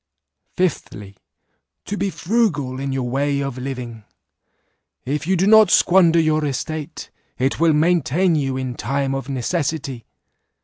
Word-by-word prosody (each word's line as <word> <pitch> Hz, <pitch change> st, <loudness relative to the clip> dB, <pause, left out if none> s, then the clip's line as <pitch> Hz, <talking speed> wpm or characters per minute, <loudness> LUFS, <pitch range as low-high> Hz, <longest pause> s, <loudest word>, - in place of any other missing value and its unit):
" -, -, -47 dB
Fifthly, 105 Hz, -, -3 dB, 0.7 s
To 205 Hz, -, -4 dB
be 200 Hz, -1 st, -1 dB
frugal 165 Hz, -, -1 dB
in 135 Hz, 0 st, -3 dB
your 130 Hz, -2 st, -2 dB
way 140 Hz, +3 st, 0 dB
of 135 Hz, -2 st, -4 dB
living; 125 Hz, -4 st, -6 dB, 1.0 s
if 145 Hz, +3 st, -3 dB
you 190 Hz, 0 st, +2 dB
do 185 Hz, -, +2 dB
not 220 Hz, -1 st, +6 dB
squander 175 Hz, -2 st, +4 dB
your 155 Hz, -1 st, +1 dB
estate, 150 Hz, +2 st, -5 dB, 0.3 s
it 135 Hz, +3 st, -1 dB
will 165 Hz, -1 st, +4 dB
maintain 170 Hz, +2 st, +2 dB
you 135 Hz, -4 st, -1 dB
in 130 Hz, -1 st, -3 dB
time 135 Hz, +2 st, -2 dB
of 135 Hz, 0 st, -5 dB
necessity. 135 Hz, -1 st, -3 dB
145 Hz, 140 wpm, -20 LUFS, 130-170 Hz, 1.0 s, not